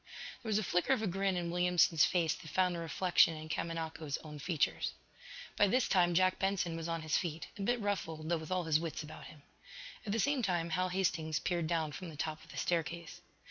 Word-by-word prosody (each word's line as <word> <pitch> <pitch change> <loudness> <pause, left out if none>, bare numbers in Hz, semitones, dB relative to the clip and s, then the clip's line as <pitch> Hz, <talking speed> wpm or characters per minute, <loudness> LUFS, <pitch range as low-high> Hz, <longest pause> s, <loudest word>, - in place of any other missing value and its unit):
There 230 - -6
was 210 - +3
a 215 - +1
flicker 180 +8 +2
of 225 - 0
a - - +1
grin 195 0 0
in 170 -1 -2
Williamson's 175 -3 +4
face 170 -4 +2
that - - -10
found 180 0 +2
a - - -4
reflection 165 0 +3
in 155 0 -8
Kamanako's 160 -3 -3
own 150 -1 -8
features. 155 0 0 0.6
By 205 - +5
this 250 +5 +2
time 175 -2 +3
Jack 185 +1 +3
Benson 190 -3 0
was 165 0 -4
on 165 -1 -2
his 155 - +2
feet, 165 -2 -4
a - - -7
bit 240 +4 +1
ruffled 165 -7 -2
though 170 0 +1
with 155 - -8
all 185 -1 +1
his 155 -2 +3
wits 165 -1 -4
about 150 - -10
him. 145 -2 -14 0.6
At 205 - -4
the 220 - +1
same 280 +3 +2
time 175 -5 0
Hal 185 +2 +1
Hastings 165 -4 0
peered 170 -1 -1
down 160 -2 0
from 175 +4 -7
the 155 - -9
top 155 +1 -3
of 165 - -18
the - - -10
staircase. 170 -1 -2
170 Hz, 225 wpm, -34 LUFS, 160-185 Hz, 0.6 s, By